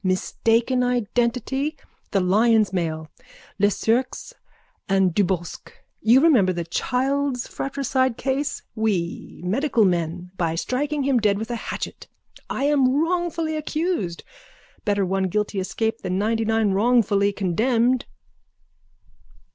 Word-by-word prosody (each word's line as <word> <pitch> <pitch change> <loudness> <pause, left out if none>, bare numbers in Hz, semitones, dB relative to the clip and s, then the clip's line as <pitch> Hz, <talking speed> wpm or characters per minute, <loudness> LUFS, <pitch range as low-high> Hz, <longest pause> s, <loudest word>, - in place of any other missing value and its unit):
Mistaken 225 +6 +1
identity. 250 +4 -1 0.3
The 195 - +1
Lyons 215 +2 +3
mail. 160 -3 -2 0.5
Lesurques 225 - 0 0.6
and 190 -2 +3
Dubosc. 180 -3 -2 0.3
You 235 +5 +5
remember 250 - +5
the 175 -1 -3
Childs 255 +8 -1
fratricide 260 -2 -1
case. 275 +2 -2
We 200 -7 -2
medical 235 +3 +2
men. 175 0 -1
By 165 -2 0
striking 285 - -1
him 265 -2 +2
dead 205 -2 +2
with 220 +3 -5
a - - -1
hatchet. 230 - -6 0.4
I 270 - -2
am 280 -2 +3
wrongfully 335 -1 -1
accused. 305 - -2 0.6
Better 200 -2 +1
one 190 +1 0
guilty 205 +2 -1
escape 220 +4 -2
than 185 -1 -2
ninetynine 225 0 +1
wrongfully 205 -2 +3
condemned. 230 +6 +1
225 Hz, 110 wpm, -23 LUFS, 190-260 Hz, 0.6 s, You